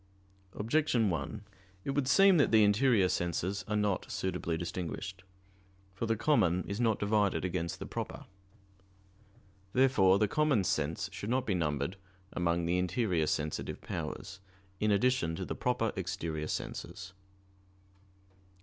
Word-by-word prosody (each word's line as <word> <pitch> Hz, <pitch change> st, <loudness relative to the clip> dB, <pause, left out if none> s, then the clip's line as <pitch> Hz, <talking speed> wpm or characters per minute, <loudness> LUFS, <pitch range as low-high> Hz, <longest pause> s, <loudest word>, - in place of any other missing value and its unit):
Objection 115 Hz, -2 st, +1 dB
1: 75 Hz, -3 st, -4 dB, 0.4 s
It -, -, -1 dB
would 135 Hz, -1 st, 0 dB
seem 195 Hz, +6 st, +6 dB
that 145 Hz, -, +4 dB
the 110 Hz, -1 st, +6 dB
interior 105 Hz, -1 st, +4 dB
senses 90 Hz, +3 st, -1 dB
are 105 Hz, -, -1 dB
not 105 Hz, -3 st, 0 dB
suitably 90 Hz, -3 st, -2 dB
distinguished. 90 Hz, +1 st, -5 dB, 0.7 s
For 105 Hz, +4 st, -3 dB
the 115 Hz, -, +2 dB
common 90 Hz, -, +2 dB
is 100 Hz, +2 st, -5 dB
not 115 Hz, -3 st, +2 dB
divided 100 Hz, -2 st, +1 dB
against 85 Hz, -2 st, -2 dB
the -, -, -6 dB
proper. -, -, -5 dB, 1.5 s
Therefore 115 Hz, -8 st, +5 dB
the 105 Hz, -, +2 dB
common 145 Hz, -4 st, +2 dB
sense 80 Hz, +1 st, -1 dB
should 100 Hz, +3 st, -5 dB
not 130 Hz, +1 st, +1 dB
be 105 Hz, -, 0 dB
numbered 75 Hz, 0 st, -1 dB, 0.4 s
among 85 Hz, -1 st, 0 dB
the 90 Hz, +2 st, +1 dB
interior 90 Hz, -4 st, 0 dB
sensitive 75 Hz, 0 st, -2 dB
powers, 95 Hz, 0 st, -6 dB, 0.4 s
in 105 Hz, -, +1 dB
addition 100 Hz, -5 st, +2 dB
to 95 Hz, -, -4 dB
the -, -, -3 dB
proper 120 Hz, -3 st, 0 dB
exterior 85 Hz, -5 st, -3 dB
senses. 95 Hz, -, -5 dB, 1.3 s
Obj. 95 Hz, -1 st, -31 dB
95 Hz, 140 wpm, -31 LUFS, 85-115 Hz, 1.5 s, seem